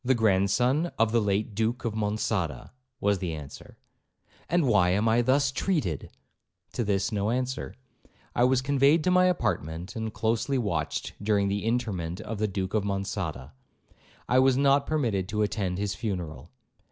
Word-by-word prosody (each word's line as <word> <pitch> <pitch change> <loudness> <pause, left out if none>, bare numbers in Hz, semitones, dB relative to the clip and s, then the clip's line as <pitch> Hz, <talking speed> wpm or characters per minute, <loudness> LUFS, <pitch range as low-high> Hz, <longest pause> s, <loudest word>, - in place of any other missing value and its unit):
'The 130 +1 +3
grandson 115 - +2
of 115 -1 +2
the 115 0 +3
late 105 +1 0
Duke 115 +3 -1
of 115 - -1
Monçada,' 105 -4 -2 0.3
was 100 -1 +1
the 85 -4 -3
answer. 70 -3 -10 0.7
'And 175 -2 +2
why 105 -8 +4
am 100 +5 +2
I 115 +2 +4
thus 135 +3 +2
treated?' 135 - -1 0.6
To 120 - -1
this 100 -1 0
no 105 0 0
answer. 130 +2 -2 0.6
I 120 - +3
was 130 0 +2
conveyed 140 +3 +3
to 180 - +2
my 180 0 +5
apartment, 90 - -1
and 110 -1 -3
closely 115 +6 0
watched 85 -11 -2
during 100 -1 +2
the 100 +1 -2
interment 105 -8 -2
of 110 -2 -6
the 110 - +1
Duke 95 -1 -3
of 110 -2 +1
Monçada. 95 - -3 0.8
I 125 - +4
was 130 -1 +4
not 140 0 +3
permitted 115 -12 0
to 105 +1 0
attend 95 -3 -2
his 100 0 -1
funeral. 90 - -5
110 Hz, 165 wpm, -27 LUFS, 95-125 Hz, 0.8 s, my